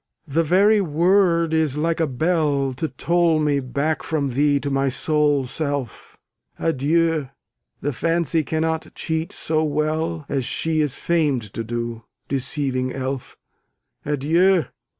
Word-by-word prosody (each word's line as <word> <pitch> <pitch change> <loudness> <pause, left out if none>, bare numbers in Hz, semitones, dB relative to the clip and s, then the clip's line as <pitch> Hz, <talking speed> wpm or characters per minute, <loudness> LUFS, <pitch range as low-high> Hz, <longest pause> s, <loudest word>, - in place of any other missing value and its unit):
the 155 +3 +1
very 200 +6 +4
word 170 0 +2
is 155 -3 +1
like 165 +2 0
a 160 - +2
bell 145 -1 0
To 145 +6 -2
toll 170 +3 +1
me 150 -2 +1
back 140 +4 -1
from 145 -4 -1
thee 145 +2 +3
to 140 +1 -3
my 135 0 +1
sole 145 +1 +1
self! 140 - -4 0.4
Adieu! 160 0 +1 0.5
the 145 +1 -1
fancy 165 +2 0
cannot 160 +1 -1
cheat 160 0 -2
so 155 0 -1
well 155 +1 -1
As 135 -2 -1
she 155 +6 0
is 145 -3 -1
famed 145 - 0
to 115 - -3
do, 115 0 -4 0.2
deceiving 130 -1 0
elf. 130 -1 -4 0.7
Adieu! 160 +4 +2
150 Hz, 130 wpm, -22 LUFS, 135-165 Hz, 0.7 s, very